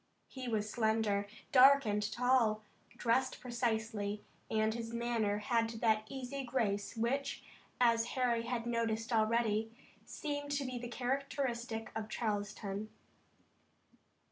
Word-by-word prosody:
He 260 -2 -6
was 215 -3 0
slender, 220 -2 +1 0.2
dark 275 +1 +8
and 210 -1 +1
tall, 240 -3 +2 0.3
dressed 255 +2 +1
precisely, 220 -4 -2 0.3
and 220 0 +2
his 230 0 -5
manner 235 -3 0
had 230 +2 +1
that 220 -1 +1
easy 270 +1 -4
grace 230 -4 -1
which, 265 +5 -1 0.4
as 230 -2 +4
Harry 240 -2 +2
had 240 -1 -2
noticed 230 -1 -1
already, 220 0 +2 0.3
seemed 290 -1 -4
to 280 -1 0
be 255 -1 -4
the 240 0 -6
characteristic 245 -3 -2
of 220 -1 -4
Charleston. 205 -2 -3
230 Hz, 115 wpm, -34 LUFS, 215-250 Hz, 0.4 s, dark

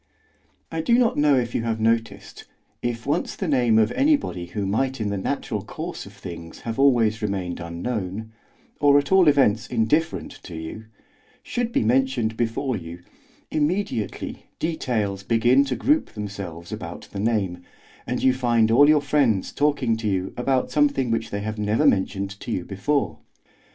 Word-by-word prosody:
I 165 0 -2
do 235 +9 +3
not 240 -2 +3
know 145 -1 +4
if 120 -2 -1
you - - 0
have 115 -1 -2
noticed, 115 +1 -1 0.4
if 120 -1 -3
once 150 +5 -1
the 190 - -3
name 125 -6 +3
of 110 +1 +4
anybody 280 - +1
who 100 +2 -3
might 130 +7 0
in 105 -2 -1
the - - -1
natural - - -2
course - - -7
of - - -13
things 85 -1 -9
have 115 +2 -4
always 115 -6 +3
remained 95 -4 -2
unknown, 95 +4 -4 0.5
or 145 -1 +6
at 145 +4 0
all 190 -3 +6
events 130 -7 +3
indifferent 125 +8 0
to 85 - -9
you, 80 +7 -7 0.6
should 240 -1 -2
be - - +1
mentioned 120 -1 +1
before 120 +3 -1
you, 85 -2 -8 0.5
immediately 155 - -2
details 115 - -1
begin 120 +6 +4
to 135 -2 -2
group 300 - +1
themselves 100 -5 -7
about - - -7
the 100 - -5
name, 100 -5 0 0.5
and - - -2
you 130 - +5
find 120 -3 +2
all 145 +5 +6
your 155 -1 +5
friends 130 -10 +1
talking 145 -6 +1
to 110 -1 -3
you 95 -2 -1
about 130 +1 0
something 140 -4 +2
which 115 0 -1
they 100 - -3
have 110 +1 -4
never 105 +8 +1
mentioned 100 -4 +1
to - - -8
you 90 - -2
before. 100 - -1
115 Hz, 165 wpm, -24 LUFS, 100-140 Hz, 0.6 s, or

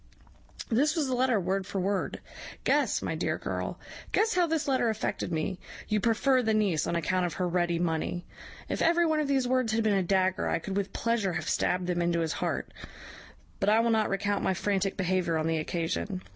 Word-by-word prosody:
"This 290 +8 +2
was 315 -3 +1
the 260 - -1
letter, 250 -3 +2
word 190 +1 -1
for 200 - -3
word. 195 +1 -1 0.4
Guess, - - +2
my - - -2
dear - - -1
girl - - -4 0.3
guess 445 +1 +2
how 360 -1 +3
this 320 -2 -1
letter 260 -4 +2
affected 220 -2 -2
me. 160 +3 -2 0.3
You 210 -1 +2
prefer 250 +4 +3
the 220 -2 +1
niece 195 -8 +1
on - - -1
account 180 +2 +1
of 170 - -5
her 180 - -1
ready 175 -1 +1
money! 170 +1 -1 0.4
If - - -3
every 340 +1 +4
one 315 -1 +2
of 300 - 0
these 270 -3 +1
words 255 -3 +1
had 225 0 +1
been 215 -1 +2
a 195 - +3
dagger, 185 0 +1
I - - +1
could 190 +4 -5
with 200 -1 -1
pleasure 230 -5 0
have 160 -1 -3
stabbed 180 0 +1
them 175 -1 0
into 170 -1 +1
his 160 -1 -1
heart; - - -3 0.9
but 195 - +2
I 215 +1 +5
will 230 0 +2
not 220 -1 +2
recount 200 +1 -1
my 190 - +1
frantic 195 0 0
behaviour 180 -3 +1
on 155 - -1
the 165 0 +1
occasion. 155 - -3
195 Hz, 215 wpm, -29 LUFS, 175-235 Hz, 0.9 s, I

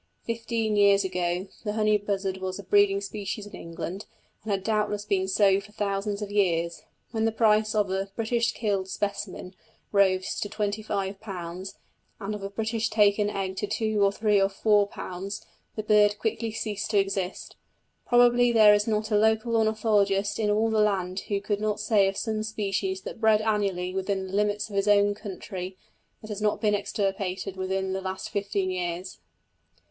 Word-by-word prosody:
Fifteen 230 -1 -1
years 200 -1 +5
ago 180 -1 -1 0.2
the 210 -2 -2
honey 215 -1 +3
buzzard 195 -2 -1
was 185 0 -4
a 200 - -8
breeding 200 +1 +3
species 205 +1 -5
in 205 - -13
England, 170 +4 -6 0.3
and 220 - -8
had 195 -1 -1
doubtless 210 -1 0
been 195 -2 0
so 195 0 +4
for 210 +1 -16
thousands 200 0 -2
of 205 - -6
years. 170 -4 +1 0.3
When 225 -1 0
the 225 - +2
price 215 -1 +3
of 205 -3 +1
a 195 +1 -2
"British 230 +1 0
killed" 200 -4 -1
specimen 200 -2 -4 0.4
rose 190 -2 +2
to 205 - -3
£25, 195 -3 -4 0.5
and 210 0 -4
of 210 - -6
a 195 - -4
"British 225 +2 -1
taken" 205 -1 +3
egg 195 -2 -3
to 205 - -2
two 215 0 0
or 200 - +4
three 210 -1 +2
or 195 - +3
four 205 0 +3
pounds, 195 +1 -6 0.3
the 215 - -3
bird 210 -1 +4
quickly 225 +1 -2
ceased 215 -2 -3
to 210 - +1
exist. 195 -1 -1 0.5
Probably 245 0 +5
there 215 -2 +7
is 205 +1 +2
not 215 0 -1
a - - +3
local 220 +2 +2
ornithologist 210 -2 +2
in 210 -2 +1
all 220 +2 +2
the 220 - +2
land 190 -3 0
who 200 -1 +1
could 205 +1 -2
not 215 -1 -1
say 210 -2 +3
of 195 - -2
some 220 -2 -1
species 195 -3 -2
that 225 - -8
bred 220 -1 +4
annually, 200 -4 0
within 190 0 -1
the 190 - -9
limits 205 0 +1
of 205 - -9
his 195 +1 +1
own 205 0 +4
country, 190 -2 -7 0.5
that 215 - -8
it - - -1
has 205 - -6
not 210 0 +1
been 210 -2 +2
extirpated 195 -2 -2
within 190 0 -2
the 190 - -2
last 190 0 -5
fifteen 200 -2 -1
years. 180 0 -4
205 Hz, 180 wpm, -27 LUFS, 195-215 Hz, 0.5 s, there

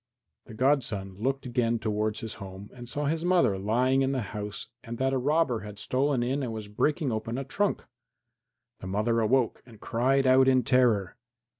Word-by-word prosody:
The 110 - -11
godson 125 -7 0
looked 135 +4 -1
again 120 -2 0
towards 110 -1 -2
his 110 - -5
home 95 +1 -9
and 120 -1 -9
saw 145 +3 -2
his 160 +3 -1
mother 175 - +3
lying 125 +6 +2
in 135 0 +1
the 130 -4 -1
house 105 -1 -5 0.2
and 120 -1 -6
that 135 +1 0
a 130 - +1
robber 145 -3 +1
had 105 -1 -9
stolen 130 +2 0
in 135 +4 -1
and 125 -4 -3
was 110 -2 -6
breaking 140 +6 0
open 115 +2 -3
a 135 - -2
trunk. 200 +10 -1 0.9
The 95 - -7
mother 110 +4 +1
awoke 115 +2 +1
and 115 -4 -16
cried 135 +5 +1
out 130 0 +5
in 130 -1 +4
terror. 120 -5 +2
120 Hz, 185 wpm, -28 LUFS, 110-135 Hz, 0.9 s, out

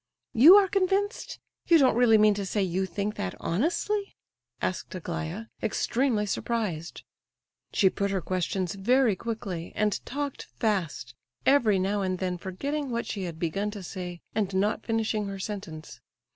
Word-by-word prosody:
"You 300 - +9
are 405 -1 +6
convinced? 395 +3 0 0.3
You 335 - +7
don't 265 -6 +4
really 235 -2 +5
mean 215 0 +5
to 200 0 -3
say 195 +1 0
you 190 +1 -1
think 200 +4 -3
that 90 - -3
honestly?" 345 - -1 0.4
asked 185 - -3
Aglaya, 170 +3 -4 0.2
extremely 230 0 +1
surprised. 200 -6 -3 0.7
She 195 - +4
put 200 +1 0
her 195 -1 0
questions 185 +1 -2
very 235 +3 +3
quickly 190 -6 -5
and 210 -1 0
talked 285 0 -4
fast, 180 - -1 0.3
every 240 -8 +4
now 200 +2 0
and 185 -1 -1
then 180 -1 -2
forgetting 280 - -3
what 235 -1 -2
she 195 -3 -4
had 170 -2 -6
begun 180 +5 -1
to 205 -2 -7
say, 180 -1 -6
and 200 -3 -1
not 205 +3 +1
finishing 220 -2 0
her 195 0 -5
sentence. 190 -6 -7
205 Hz, 155 wpm, -27 LUFS, 185-235 Hz, 0.7 s, You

